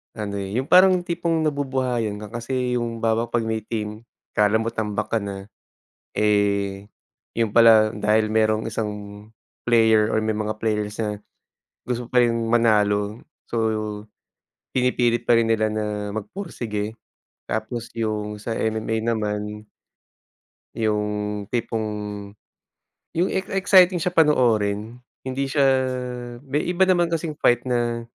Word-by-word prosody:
ano 105 -2 -4
eh, 100 +2 -5
yung 130 +2 -1
parang 185 0 +7
tipong 170 -2 -1
nabubuhayan 130 -7 -1
ka 105 - -9
kasi 125 0 -1
yung 115 -1 -4
halimbawa 115 +1 +1
pag 120 0 0
may 110 0 -1
team, 110 +1 -5 0.2
kala 105 +1 +3
mo 110 +1 0
tambak 105 -1 -3
ka 115 - +2
na. 100 0 -7 0.6
Eh 100 -2 +1 0.5
yun 115 -3 0
pala 110 -2 +6
dahil 110 +1 +1
merong 110 0 +2
isang 110 -1 -2 0.7
player 110 -2 +4
or - - +1
may 110 0 0
mga 110 0 -3
players 105 -1 -2
na 105 -2 -3 0.6
gusto 125 -1 -3
pa 125 0 +3
ring 115 -1 +1
manalo. 105 -2 +2 0.3
So 120 - -1 1.2
pinipilit 120 -2 +2
pa 120 -1 +4
rin 115 - +1
nila 110 -1 +1
na 105 -1 -3
magpursige. 110 - -4 0.5
Tapos 110 +2 -4
yung 105 -2 -3
sa 115 +2 -4
MMA 110 0 -1
naman 105 -1 -3 1.1
Yung 105 -1 -1
tipong, 115 -2 -1 1.3
yung 175 +3 +1
ex 190 0 -1
exciting 185 -2 +5
siya 180 - +1
panoorin 115 - +2 0.3
hindi 135 +1 -2
siya, 140 +1 +2 0.8
may 145 +2 -1
iba 180 +1 +2
naman 180 -2 +3
kasing 165 -2 -3
fight 120 0 +3
na 120 -2 -1
110 Hz, 130 wpm, -23 LUFS, 105-125 Hz, 1.3 s, parang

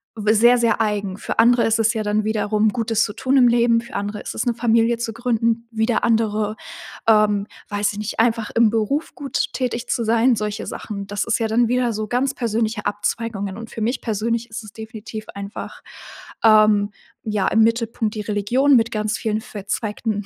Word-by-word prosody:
w 215 -1 +1
sehr, 240 +3 +5
sehr 230 -2 +2
eigen. 205 -3 -1
Für - - -5
andere 240 +1 +5
ist 225 0 +2
es 225 +2 +2
ja 220 - -1
dann 210 +1 0
wiederum 215 0 +1
Gutes 225 0 0
zu 205 - -3
tun 260 +4 0
im 255 -3 +6
Leben. 235 -1 +3
Für 235 - -12
andere 205 +1 -3
ist - - -7
es - - -2
'ne 240 - +1
Familie 230 0 +2
zu 235 -1 -2
gründen, 230 0 -1
wieder 220 0 0
andere, 215 -2 +1 0.5
ähm, 210 -2 +3 0.2
weiß 205 0 0
ich - - -9
nicht, 215 +1 -4
einfach 225 -1 +1
im 230 -1 +4
Beruf 230 +8 -1
gut 280 -2 -2
tätig 245 -2 -2
zu 235 - -1
sein, 230 +2 +3
solche 210 0 -4
Sachen. 200 -2 -6
Das 205 0 -2
ist - - 0
ja 225 - 0
dann 230 +2 +2
wieder 245 0 +1
so 215 0 -3
ganz 255 +4 0
persönliche 220 -2 -1
Abzweigungen, 205 -1 -2
und 230 0 -9
für 225 - -6
mich 240 +4 -1
persönlich 230 +2 -2
ist 225 +1 -6
es 215 - -12
definitiv 220 0 -8
einfach, 200 +1 -7 0.6
ähm, 215 -2 +5 0.3
ja, 210 -3 -1
im 225 - +3
Mittelpunkt 230 -1 0
die 215 - -4
Religion 220 +7 +2
mit 230 -1 +3
ganz 215 -1 -1
vielen 220 -1 -2
verzweigten 210 0 -4
220 Hz, 195 wpm, -21 LUFS, 210-235 Hz, 0.6 s, im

